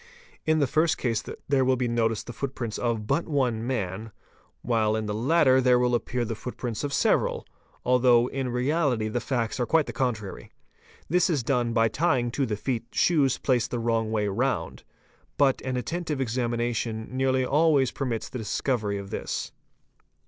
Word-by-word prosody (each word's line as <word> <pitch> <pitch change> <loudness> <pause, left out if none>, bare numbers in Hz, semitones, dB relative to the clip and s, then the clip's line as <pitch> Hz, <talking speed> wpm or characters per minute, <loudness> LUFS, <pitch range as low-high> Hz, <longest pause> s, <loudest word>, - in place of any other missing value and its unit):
In 155 0 +4
the 145 - +3
first 155 +5 +2
case 115 -3 -1 0.2
there 140 -2 +3
will 130 0 +3
be 125 -1 -1
noticed 115 -2 0
the 120 - -7
footprint 125 -4 -4
of 115 -3 -1
but 165 - 0
one 125 -7 0
man, 110 -3 -3 0.5
while 110 -2 +1
in 110 0 -2
the 105 - -2
latter 130 +3 +4
there 125 -1 +4
will 125 0 +1
appear 120 +1 -1
the 115 - -3
footprints 120 0 -5
of 145 - -2
several, 140 - +1 0.4
although 125 -1 +4
in 135 -2 -3
reality 125 -3 0
the 120 - -1
facts 120 -1 -2
are 120 - 0
quite 160 -2 +3
the - - -6
contrary. 110 -7 -3 0.6
This 180 +4 +2
is 150 -8 0
done 120 -2 +1
by 115 -1 +3
tying 125 -1 +1
to 135 +1 -1
the 105 -2 -2
feet 120 +1 -2
shoes 145 -7 +2
placed 125 -3 +1
the 125 - -2
wrong 115 -1 0
way 105 -2 0
round; 120 +6 -1 0.6
but 140 -2 +3
an 130 -1 -2
attentive 155 +3 -3
examination 120 -2 -1
nearly 130 0 +2
always 145 -2 +3
permits 120 -5 -3
the 130 - -6
discovery 110 -1 -1
of 100 0 -8
this. - - -4
125 Hz, 175 wpm, -26 LUFS, 115-135 Hz, 0.6 s, In